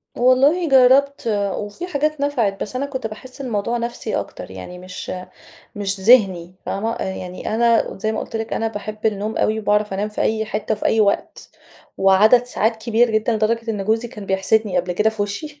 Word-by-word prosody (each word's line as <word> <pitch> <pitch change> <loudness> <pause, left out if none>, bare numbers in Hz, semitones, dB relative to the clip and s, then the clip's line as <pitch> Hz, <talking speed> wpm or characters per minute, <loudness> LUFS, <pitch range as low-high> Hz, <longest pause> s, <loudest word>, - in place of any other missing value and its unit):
والله 275 +8 +3
جرّبت، 270 +2 +5 0.4
وفي 210 - -6
حاجات 305 -2 -1
نفعِت 235 -9 0
بس 215 - -4
أنا 275 +2 -1
كنت 260 -5 -4
باحس 255 +6 -10
الموضوع 235 -1 -1
نفْسي 235 -2 -3
أكتر، 90 - -5
يعني 95 - -9
مش 185 0 -7 0.6
مش 195 -1 -3
ذِهني 190 -5 +4
فاهمة؟ 225 +4 -2
يعني 185 +2 -4
أنا 235 0 +2
زي 220 +2 -1
ما - - -2
قُلت 225 - -5
لِك، 225 0 -4
أنا 225 - 0
باحب 215 0 -5
النوم 215 +1 -2
أوي، 215 +1 +1
وباعرف 210 -1 +1
أنام 205 +2 -1
في 210 - -7
أي 220 0 +1
حِتَّة، 215 0 -2
في 210 - -3
أي 220 - +2
وقت، 200 -1 -1 0.5
وعدد 210 +6 +5
ساعات 225 -2 0
كبير 230 +1 +2
جدًا، 220 +2 +1
لدرجة 230 +1 0
إن 205 -3 -3
جوزي 225 +3 0
كان 210 -3 -10
بيحسِدني 195 +2 +1
قبل 180 +1 -1
كده 215 +4 +2
في 220 -2 -3
وشي 285 +9 -6
220 Hz, 185 wpm, -20 LUFS, 205-240 Hz, 0.6 s, جرّبت